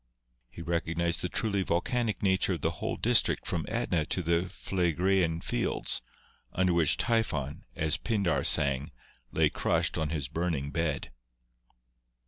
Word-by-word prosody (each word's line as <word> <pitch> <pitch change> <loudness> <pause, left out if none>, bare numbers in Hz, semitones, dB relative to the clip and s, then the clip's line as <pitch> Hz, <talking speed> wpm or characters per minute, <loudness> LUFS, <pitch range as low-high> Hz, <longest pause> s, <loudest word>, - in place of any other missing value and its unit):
He 85 - -9
recognised 85 +1 0
the 90 - -2
truly 100 -1 0
volcanic 105 +6 -1
nature 95 0 +3
of 85 - -4
the 80 - +1
whole 80 - -3
district - - +3
from - - -2
Etna 80 -3 0
to 90 - -1
the 85 +2 +1
Phlegraean 90 -2 0
Fields, - - 0 0.5
under 95 -1 +2
which 85 -4 +3
Typhon, 75 - -1
as 75 -1 +3
Pindar 100 -8 0
sang, 70 -1 +1 0.4
lay - - +2
crushed - - 0
on 80 -1 -1
his 75 -4 -2
burning 75 -2 -2
bed. 80 -4 -2
85 Hz, 135 wpm, -29 LUFS, 80-95 Hz, 0.5 s, nature